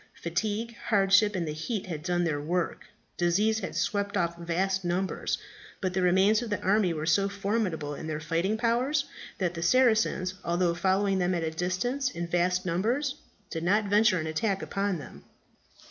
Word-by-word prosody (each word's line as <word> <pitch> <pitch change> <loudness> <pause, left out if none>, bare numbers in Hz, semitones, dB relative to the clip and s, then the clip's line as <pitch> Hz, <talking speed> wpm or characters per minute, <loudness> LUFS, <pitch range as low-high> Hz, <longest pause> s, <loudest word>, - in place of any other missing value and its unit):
Fatigue, 215 +7 -2
hardship, 205 0 +4
and 170 -3 -1
the - - -2
heat 185 +7 -3
had 165 -5 -5
done 175 +1 0
their 150 -4 -1
work; 170 +3 -2 0.3
disease 205 +6 +2
had 190 - -5
swept 200 0 -1
off 170 -2 0
vast 185 +3 -1
numbers. 180 +2 -1 0.4
But 185 -1 -2
the 185 - 0
remains 190 +5 +4
of 240 - -5
the 205 - -1
army 195 -1 +2
were 155 -2 -3
so 195 +5 +3
formidable 195 -7 -2
in 155 - -7
their 155 -1 -3
fighting 165 +7 0
powers 250 +5 +1 0.3
that 180 -3 -1
the 165 - -5
Saracens, 220 -3 +3
although 175 0 +1
following 190 +2 +1
them 180 0 +1
at 170 - -1
a 160 - -1
distance 185 +11 -1
in 170 -6 -4
vast 180 +2 +1
numbers, 235 - 0 0.4
did 165 -1 -3
not 205 +5 +2
venture 210 -1 +4
an 160 - -3
attack 190 +5 -1
upon 195 -2 -1
them. 145 - -11
185 Hz, 175 wpm, -28 LUFS, 170-210 Hz, 0.4 s, hardship